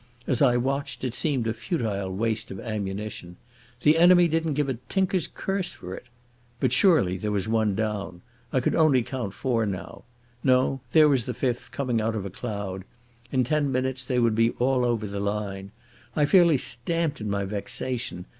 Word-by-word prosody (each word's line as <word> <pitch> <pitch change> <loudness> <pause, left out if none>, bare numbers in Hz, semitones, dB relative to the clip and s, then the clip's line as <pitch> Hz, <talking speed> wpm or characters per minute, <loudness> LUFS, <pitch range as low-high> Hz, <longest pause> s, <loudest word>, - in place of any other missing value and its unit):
As 125 - 0
I 125 -3 +5
watched 135 0 -2
it 125 -3 -2
seemed 135 -4 0
a 115 - 0
futile 110 - -2
waste 110 +3 -2
of 95 - -7
ammunition. 100 -4 -5 0.4
The 150 +4 +4
enemy 175 0 +7
didn't 160 -2 0
give 145 -1 +1
a 130 -4 -3
tinker's 190 -2 +1
curse 195 -2 -3
for 90 +1 -8
it.... - - -9 0.5
But - - +1
surely 130 - +4
there 105 +3 -3
was 100 0 -1
one 110 -3 +1
down. 105 -4 -3 0.3
I 130 - +2
could - - 0
only 145 -6 +4
count 115 -6 -5
four 120 -4 0
now. 95 -2 -6 0.4
No, 130 +1 +2
there 155 +1 +7
was 135 -6 +2
the 125 - -3
fifth 125 -2 -2
coming 125 -5 -1
out 110 +1 -1
of 100 -3 -3
a 100 - -5
cloud. 100 -3 -5 0.5
In 130 -2 +2
ten 145 +2 0
minutes 130 0 -1
they 125 0 -1
would 115 -2 +3
be 115 +1 +3
all 125 0 +2
over 115 -3 0
the 100 0 -4
line. 100 -1 -3 0.5
I 150 - +3
fairly 170 -2 +5
stamped 140 +5 -1
in 105 - -3
my 100 0 -1
vexation. 105 0 -4
120 Hz, 185 wpm, -26 LUFS, 105-140 Hz, 0.5 s, enemy